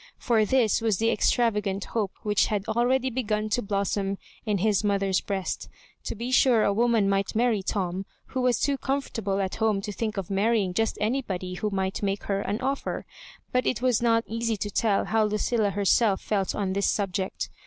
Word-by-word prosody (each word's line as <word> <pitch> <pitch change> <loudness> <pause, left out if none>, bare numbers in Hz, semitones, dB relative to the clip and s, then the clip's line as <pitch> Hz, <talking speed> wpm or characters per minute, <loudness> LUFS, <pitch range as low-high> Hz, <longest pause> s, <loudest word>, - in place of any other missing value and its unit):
For 225 -3 +2
this 235 -2 +2
was 220 -4 +1
the 225 +3 +2
extravagant 210 -5 +1
hope 210 -5 -2
which 210 -2 +2
had 205 -1 -2
already 255 +3 +1
begun 215 -3 -1
to 245 - +1
blossom 200 -1 -1 0.3
in 210 -1 +2
his 205 +1 +2
mothqg| 195 -2 0
breast. 195 -2 -3 0.4
To - - -3
be 235 +4 -4
sure 250 -4 +5
a 200 - +2
woman 230 -1 +2
might 195 +1 0
marry 230 -3 +2
Tom, 190 -1 -2 0.2
who 260 - -2
was 250 -3 +2
too 280 -2 0
comfortable 225 -8 -2
at 190 -1 -2
home 220 -3 +2
to 210 - -5
think 215 +1 -3
of 195 -1 -4
marrying 200 -1 +1
just 225 +4 0
anybody 210 -6 -2
who 210 +4 -2
might 190 -1 -2
make 200 0 -1
her 195 -1 -1
an 205 - -2
oflfer. 270 +3 -2 0.5
But 250 0 +1
it 250 - -1
was 250 -3 +2
not 230 -1 +3
easy 230 0 -2
to 205 +1 -4
tell 205 -1 +1
how 220 0 +2
Lucilla 210 +1 +1
herself 200 +1 +2
felt 195 -3 -1
on 195 -2 -1
this 200 +1 +1
subject. 190 -2 -2
210 Hz, 190 wpm, -26 LUFS, 195-230 Hz, 0.5 s, sure